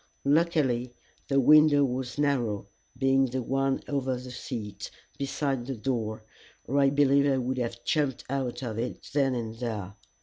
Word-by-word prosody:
Luckily 140 -6 +2 0.3
the 140 -1 +3
window 150 +1 +6
was 125 0 -3
narrow, 125 -9 0 0.3
being 135 0 +3
the 130 +1 -3
one 135 +2 0
over 135 -2 -1
the 125 0 -8
seat, 105 -4 -6 0.3
beside 135 -2 -2
the 135 - -3
door, 110 -3 -2 0.4
or 140 +4 0
I 140 -1 +5
believe 140 0 +4
I 135 - +2
would 130 0 -1
have 120 -1 -4
jumped 145 -4 0
out 135 -1 -3
of 115 -3 -4
it 120 - -4
then 135 -3 +2
and 115 -2 -3
there. 105 -6 -4
130 Hz, 160 wpm, -28 LUFS, 120-140 Hz, 0.4 s, window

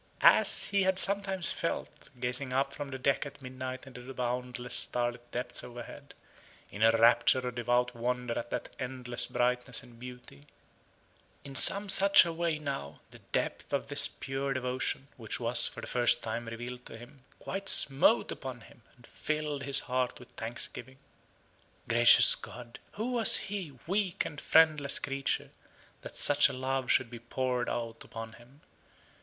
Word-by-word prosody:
As - - +5
he 200 -1 0
had 190 -1 +1
sometimes 195 -2 +1
felt, 165 - -5
gazing 125 +2 -2
up 135 +2 -1
from 145 -1 -7
the 130 - -6
deck 135 +1 0
at 140 - -13
midnight 130 0 -8
into 125 -2 -12
the 130 +2 -11
boundless 125 0 -4
starlit 120 0 +1
depths 125 0 -5
overhead, 125 +4 -11 0.6
in 100 - -9
a 115 - +6
rapture 120 +3 +3
of 125 - -5
devout 120 +1 -1
wonder 125 0 -3
at 120 - -8
that - - -5
endless 125 -2 -1
brightness 125 +1 -1
and 120 -2 -17
beauty 125 - -12 1.0
in 140 - -10
some 200 +8 +5
such 195 -1 +5
a 170 - -4
way 165 -1 -2
now, 140 - -6
the - - -14
depth - - -3
of 140 -1 -2
this 140 0 +6
pure 135 0 -5
devotion 130 +1 -3
(which 115 -3 -6
was, 120 0 +3
for - - -9
the - - -7
first 120 -1 +2
time, 115 +1 -5
revealed 120 +2 -8
to 115 - -11
him) 120 +3 -16
quite 195 0 -4
smote 140 +12 +4
upon 130 -3 -8
him, 115 - -18
and 120 - -20
filled 150 0 -4
his 140 0 +3
heart 125 -1 -3
with 125 - -16
thanksgiving. 120 +2 -5 0.9
Gracious 120 +1 +7
God, 120 0 -9
who 225 +5 -4
was 235 -4 +6
he, 185 -9 -7
weak 190 0 -2
and 150 - -8
friendless 155 -4 +3
creature, 135 0 -3 0.5
that - - -10
such 145 0 +5
a - - -7
love 130 0 -3
should 125 -2 +1
be 120 - -9
poured 125 +1 -3
out 115 -1 -5
upon 115 0 -9
him? 125 +6 -19
125 Hz, 165 wpm, -29 LUFS, 120-140 Hz, 1.0 s, Gracious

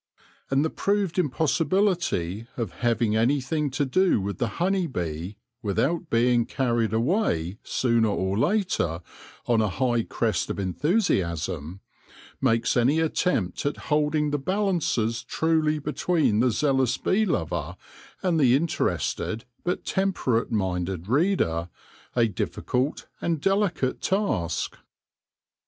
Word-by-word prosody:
And 135 +3 +2
the 160 - -1
proved 200 -3 0
impossibility 160 - 0
of 115 -6 -2
having 115 -2 +1
any 120 +6 +3
thing 150 +3 -1
to 145 +2 -1
do 185 - +3
with 100 -1 -4
the 120 - +1
honey 185 0 +1
bee 90 - -4 0.2
without 155 - 0
being 120 0 +3
carried 120 -4 0
away 110 - 0
sooner 115 -3 +2
or 95 -2 -1
later 115 - 0 0.4
on 115 -2 +3
a 105 - +1
high 120 +1 0
wave 105 -7 0
of - - -3
enthusiasm, 95 - -1 0.6
makes 115 -3 +2
any 130 +6 +3
attempt 160 - 0
at 145 - -1 0.2
holding 150 0 +1
the 145 - 0
balances 155 - 0
truly 155 +3 +1
between 150 -5 +1
the 125 +2 +4
zealous 130 0 +1
bee 215 +3 +1
lover 215 - -2 0.5
and 175 -4 +2
the 130 -4 +5
interested 135 -6 -1 0.2
but 180 - -2
temperate 185 - 0
minded 95 -3 -2
reader, 125 - +1 0.5
a 120 -2 +4
difficult 125 +6 -2 0.2
and 165 -2 0
delicate 195 -7 0
task. 145 - -1
130 Hz, 120 wpm, -25 LUFS, 110-165 Hz, 0.6 s, the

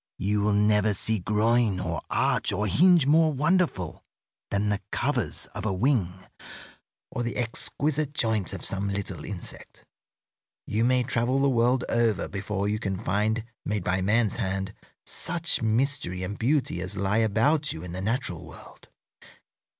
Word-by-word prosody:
You 105 +2 0
will 105 0 +2
never 105 0 +3
see 110 +3 0
groin 105 +1 +2
or - - -3
arch - - +1
or 105 +1 -1
hinge 170 - +5
more 155 +2 +4
wonderful 150 - 0 0.5
than 100 +1 0
the 105 -1 -1
covers 125 - 0
of - - -6
a 110 - 0
wing 105 -2 +1 1.0
or - - -3
the 120 0 -3
exquisite 140 +5 0
joint 110 - 0
of - - -6
some 100 +1 -1
little 100 -5 -4
insect. 95 -4 -9 0.8
You 110 +2 0
may 125 +1 +3
travel 125 +1 0
the 140 0 +3
world 125 +1 +2
over 115 -3 +1
before 100 0 -3
you 105 +1 -1
can 100 -4 -2
find, 110 +3 0 0.2
made 105 -2 -2
by 95 +1 0
man's 105 +2 +2
hand, 95 -2 -2 0.3
such 170 -4 0
mystery 110 -5 0
and 95 +3 -4
beauty 125 - 0
as 95 +2 -4
lie 100 +2 +1
about 115 +8 +2
you 80 - -7
in 90 - -7
the 90 +2 -5
natural 100 - -2
world. 80 -4 -14
110 Hz, 155 wpm, -26 LUFS, 100-125 Hz, 1.0 s, hinge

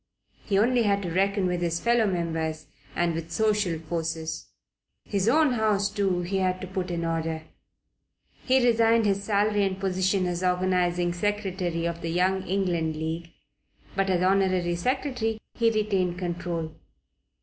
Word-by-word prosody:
He 200 - +1
only 240 +4 +3
had 200 -2 +1
to 175 - -3
reckon 195 +2 +1
with 180 -1 -1
his 170 -1 0
fellow 235 0 +3
members 165 -3 -2 0.3
and 175 -1 +1
with 165 0 -5
social 210 -3 +1
forces. 160 0 -4 0.6
His 200 +1 0
own 305 +1 +4
house 210 -3 +1
too 190 -4 0
he 190 +3 -2
had 185 -1 0
to - - -4
put 185 0 -4
in 170 -1 -2
order. 165 -1 -2 1.0
He 260 -1 +3
resigned 230 -1 +4
his 200 -1 +1
salary 205 0 +2
and 190 -1 -1
position 190 0 +1
as 175 0 -2
Organizing 180 -1 +1
Secretary 185 -3 -2
of 170 0 -3
the 165 - -3
Young 185 +3 +1
England 175 -4 0
League, 160 +2 -4 0.6
but 195 0 +1
as 180 -1 +2
Honorary 185 -2 +2
Secretary 245 +2 -1
he 230 -1 +2
retained 195 -5 0
control. 170 -2 -3
185 Hz, 150 wpm, -26 LUFS, 170-205 Hz, 1.0 s, own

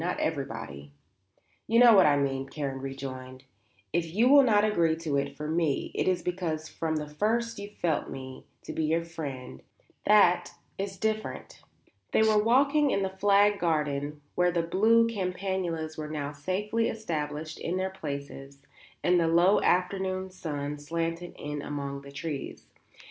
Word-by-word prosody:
"Not 180 - -2
everybody." 115 - -4 0.8
"You 230 - +2
know 240 -1 +8
what 190 -6 +7
I 145 -1 +4
mean," 135 -1 -1
Karen 135 -2 -4
rejoined. 130 -1 -7 0.5
"If 165 0 -1
you 230 +4 +4
will 285 +1 +9
not 215 -5 +4
agree 170 -6 +2
to 160 -3 -3
it 140 0 -2
for 150 - -4
me, 160 -2 0
it - - -1
is 185 -1 +1
because 170 -4 -3
from 160 -1 -3
the 150 -1 -3
first 225 +9 -1
you 200 0 -7
felt 170 -7 -1
me 130 -1 -9 0.2
to - - -6
be 160 - -1
your 165 +2 +1
friend; 145 -6 -7 0.4
that 200 -4 +4 0.2
is 195 0 -4
different." 215 +2 -3 0.5
They - - +5
were 215 -1 +4
walking 280 +5 +4
in 195 - +1
the 190 0 -3
flagged 205 +1 +4
garden 150 -3 -1
where 180 0 +2
the 170 -1 0
blue 225 +7 +4
campanulas 180 -6 -3
were 150 0 -5
now 145 -2 -3
safely 200 +10 -1
established 155 -7 -4
in 175 +2 -2
their 190 0 -1
places 140 -5 -7 0.5
and 175 0 +4
the 165 - +2
low 175 +5 +4
afternoon 185 +1 0
sun 150 -5 -5
slanted 165 +3 -3
in 150 0 -5
among 140 -1 -5
the 140 0 -12
trees. 145 0 -6
165 Hz, 160 wpm, -28 LUFS, 145-195 Hz, 0.8 s, will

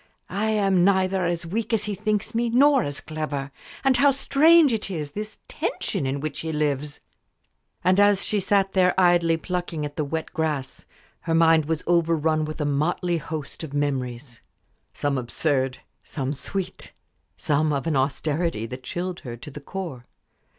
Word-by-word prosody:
"I 200 +3 -1
am 195 -4 +3
neither 190 -1 +2
as 170 0 -2
weak 220 +6 -3
as 215 -2 +2
he 210 -1 -2
thinks 210 +2 -1
me 235 +1 +1
nor 270 +3 +5
as 145 -7 -4
clever. 150 -3 -4 0.3
And 270 -2 +4
how 280 +3 +5
strange 285 +2 +5
it 215 -2 -2
is 155 -6 -4
this 215 +5 -6
tension 140 - -2
in 135 +2 -2
which 155 -1 -4
he 160 - -3
lives!" 150 -1 -2 0.8
And 185 +2 +4
as 205 -1 +4
she 210 - +1
sat 195 0 +1
there 185 -1 +3
idly 175 -2 +4
plucking 175 -3 -3
at 145 0 -8
the 155 - +1
wet 160 +2 -4
grass, 150 -5 -3 0.3
her 165 - -1
mind 165 -1 +5
was 160 0 -2
overrun 165 -2 +2
with 155 +1 -6
a 150 - 0
motley 160 +4 0
host 155 -1 -6
of 145 -3 -6
memories 130 -3 -3 0.5
some 140 -2 -1
absurd, 130 +1 0 0.3
some 140 -1 -3
sweet, 180 +7 -5 0.4
some 150 +1 +1
of 140 0 -1
an 165 -3 0
austerity 140 -1 0
that 125 +3 -7
chilled 175 +5 -4
her 120 -2 -7
to 150 +5 -10
the 150 - -9
core. 140 -7 -6
165 Hz, 170 wpm, -24 LUFS, 145-195 Hz, 0.8 s, nor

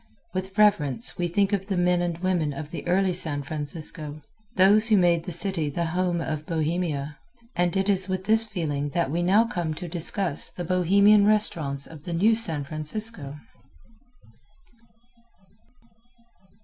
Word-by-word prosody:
With 190 +2 -5
reverence 210 - +2
we 175 - 0
think 200 +4 0
of 195 -1 -2
the 195 -3 -2
men 180 0 +2
and 175 -2 -2
women 175 -5 -1
of 150 +2 -8
the 175 - -7
early 185 +1 +1
San 150 -5 -2
Francisco 150 +1 -3 0.3
those 205 +4 +4
who 215 - +5
made 170 -2 +2
the 180 - -5
city 170 -3 0
the 170 +4 -3
Home 180 -1 0
of 155 -1 -5
Bohemia 155 -3 -3 0.4
and 175 +2 0
it 195 0 0
is 190 -2 0
with 185 0 -3
this 220 +1 +4
feeling 150 -8 -3
that 170 -6 0
we 170 +3 -1
now 195 +6 +3
come 170 -8 -3
to 175 +2 -7
discuss 170 -1 -2
the 175 - -7
Bohemian 200 +4 +4
restaurants 155 -10 +2
of 155 -2 -13
the 175 - -5
New 205 +7 +3
San 165 -10 -1
Francisco. 155 +1 -1
175 Hz, 155 wpm, -25 LUFS, 155-195 Hz, 0.4 s, who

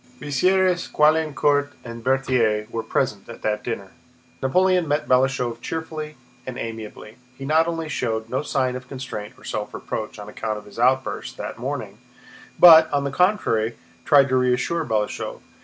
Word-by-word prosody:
Bessières, 180 +6 +1
Caulaincourt, 150 -2 +2
and 115 -1 -8
Berthier 125 -5 +1
were 115 - -2
present 110 -2 -2
at 115 - -10
that 105 0 -1
dinner. 100 -5 -5 0.5
Napoleon 180 +5 +2
met 145 +1 0
Balashëv 125 -2 +1
cheerfully 155 -1 -5 0.3
and 130 -1 -5
amiably. 110 -1 -7 0.2
He 135 - -7
not 160 +3 +3
only 165 -1 -3
showed 115 -6 -2
no 130 +4 -1
sign 130 -4 -1
of 130 0 -8
constraint 125 -6 -7
or - - -19
self - - -4
reproach 110 0 -5
on 105 0 -9
account 110 0 -4
of 105 - -10
his 105 - -12
outburst 130 +2 0
that - - -6
morning, - - -5 0.6
but, 160 -2 +9
on 145 -1 +1
the 140 - -2
contrary, 120 - +1 0.3
tried 145 -3 +5
to 130 - +2
reassure 125 +6 +1
Balashëv. 110 -6 -2
130 Hz, 155 wpm, -23 LUFS, 115-155 Hz, 0.6 s, but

